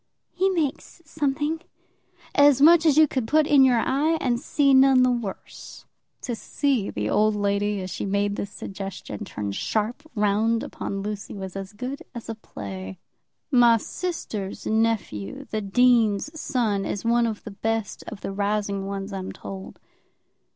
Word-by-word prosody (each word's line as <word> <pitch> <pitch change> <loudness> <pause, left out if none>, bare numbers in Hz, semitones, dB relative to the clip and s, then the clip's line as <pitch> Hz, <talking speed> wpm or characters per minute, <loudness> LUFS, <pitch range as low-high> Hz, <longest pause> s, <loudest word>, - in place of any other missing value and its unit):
"He 380 +2 +1
makes 335 -1 -2
something." 300 +1 -1 0.7
"As 285 -2 +6
much 325 +3 +7
as 300 -2 +4
you 315 -1 +7
could 260 -5 -2
put 310 +4 +4
in 285 -2 +6
your 255 -2 +5
eye 295 +7 +1
and 240 -2 0
see 275 +1 +2
none 265 -1 +6
the 255 - +4
worse." 235 -5 -6 0.4
To 245 - -3
see 260 -3 -1
the 105 0 -3
old 215 - +3
lady, 205 0 0
as 185 0 -6
she - - -4
made 200 +1 0
this 200 - -4
suggestion, 195 - -7
turn 100 -1 -4
sharp 220 - -2
round 215 +2 +2
upon 195 0 -5
Lucy, 210 0 -5
was 190 -2 -7
as 195 0 -6
good 255 +8 -5
as 235 - -7
a - - -1
play. 95 - -8 0.5
"My 240 -2 +6
sister's 220 - -5
nephew, 215 - -1
the 215 - -1
dean's 230 +3 +3
son, 220 -7 0
is 205 - -4
one 235 0 +3
of 220 -2 -5
the 215 - -7
best 225 +1 -3
of 215 -3 -8
the - - -4
rising 200 -1 -1
ones, 195 0 -5
I'm 190 -1 -4
told." 190 -1 -9
220 Hz, 160 wpm, -25 LUFS, 200-265 Hz, 0.7 s, much